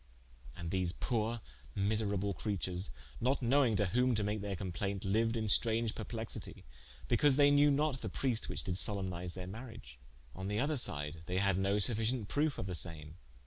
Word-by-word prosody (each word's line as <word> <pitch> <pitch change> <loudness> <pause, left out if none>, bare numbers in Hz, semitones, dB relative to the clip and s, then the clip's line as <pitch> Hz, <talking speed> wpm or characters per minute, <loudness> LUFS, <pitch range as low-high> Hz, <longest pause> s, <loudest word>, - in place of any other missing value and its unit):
And 85 -1 -5
these 90 -2 0
poore 115 -1 -1 0.3
miserable 100 -1 0
creatures, 95 - -3 0.3
not 130 +2 +1
knowing 125 -2 +4
to 105 - +2
whom 125 +6 +2
to 105 - +1
make 105 0 -1
their 100 -1 -3
complainte, 95 +2 -3
liued 115 +4 +2
in 110 - -1
straunge 115 +1 +2
perplexitie, 110 0 -5 0.4
bicause 130 +3 +4
they 145 0 +6
knew 145 +1 +6
not 145 -2 +1
the 110 - -3
priest 120 +3 -1
which - - -3
did 90 -2 -2
solempnise 90 -4 -1
their 90 -1 -5
mariage. 95 - -9 0.4
On 95 +1 -5
the 105 +1 -1
other 145 +3 +1
side 75 - -1
they 90 - -1
had 100 -1 +2
no 100 +1 +2
sufficient 110 +1 +1
proofe 145 0 +1
of - - -3
the 95 - -4
same. 80 -2 -4
105 Hz, 180 wpm, -34 LUFS, 95-120 Hz, 0.4 s, they